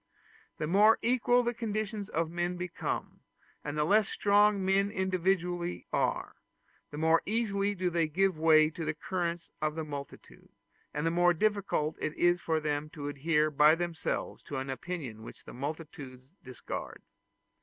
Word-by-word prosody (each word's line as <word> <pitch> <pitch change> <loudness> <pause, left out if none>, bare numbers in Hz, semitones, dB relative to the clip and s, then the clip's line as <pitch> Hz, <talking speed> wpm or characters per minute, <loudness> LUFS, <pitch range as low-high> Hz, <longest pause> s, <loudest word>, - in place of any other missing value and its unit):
The 155 - -2
more 205 +7 +5
equal 245 +1 +3
the 240 0 -1
conditions 215 -2 -3
of 160 +1 -1
men 175 +1 -2
become, 175 -1 -4 0.4
and 150 +1 -4
the 150 - +2
less 205 +5 +3
strong 205 -1 +3
men 195 +1 +3
individually 180 -2 -1
are, - - -1 0.5
the 145 - -8
more 160 +1 +3
easily 205 -2 0
do 180 -1 -1
they 165 -1 +1
give 190 +4 +1
way 155 -1 +5
to 165 - -6
the 155 0 -2
current 170 0 -3
of 155 0 0
the 160 - -3
multitude, 145 -2 -9 0.4
and 150 +2 -3
the 165 - +2
more 175 +1 +4
difficult 200 -6 0
is 155 - -3 0.2
it - - -19
for 160 -1 0
them 150 0 -2
to 145 -2 -6
adhere 150 +2 +1
by 150 +2 +6
themselves 170 -2 -3
to 145 - -5
an 135 0 -3
opinion 135 -7 -6
which 110 - -12
the - - -10
multitude 140 -2 -7 0.2
discard. 130 -1 -7
170 Hz, 160 wpm, -30 LUFS, 150-195 Hz, 0.5 s, by